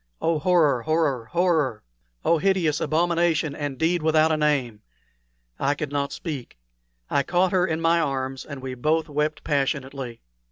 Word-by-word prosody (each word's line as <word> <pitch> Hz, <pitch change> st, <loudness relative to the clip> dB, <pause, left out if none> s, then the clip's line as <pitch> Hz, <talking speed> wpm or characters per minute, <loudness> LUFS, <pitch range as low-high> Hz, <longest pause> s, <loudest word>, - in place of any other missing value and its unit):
Oh, 165 Hz, -1 st, +1 dB
horror, 150 Hz, -6 st, +3 dB
horror, 155 Hz, -5 st, 0 dB
horror! 160 Hz, -7 st, +1 dB, 0.4 s
Oh, 170 Hz, -, +3 dB
hideous 180 Hz, -5 st, +1 dB
abomination 165 Hz, -2 st, +1 dB
and 145 Hz, -3 st, -4 dB
deed 170 Hz, +3 st, +1 dB
without 160 Hz, 0 st, +3 dB
a -, -, +3 dB
name! 140 Hz, -8 st, 0 dB, 0.8 s
I 140 Hz, +2 st, +1 dB
could 145 Hz, -1 st, -4 dB
not 140 Hz, 0 st, -1 dB
speak. 145 Hz, -, -6 dB, 0.5 s
I 140 Hz, -, +3 dB
caught 175 Hz, +5 st, +1 dB
her 185 Hz, -1 st, +2 dB
in 160 Hz, -2 st, -1 dB
my 165 Hz, +1 st, +3 dB
arms, 135 Hz, -3 st, -2 dB
and 140 Hz, -3 st, -9 dB
we 130 Hz, -1 st, -4 dB
both 155 Hz, +5 st, 0 dB
wept 150 Hz, +1 st, -1 dB
passionately. 135 Hz, -4 st, -2 dB
150 Hz, 155 wpm, -24 LUFS, 135-165 Hz, 0.8 s, horror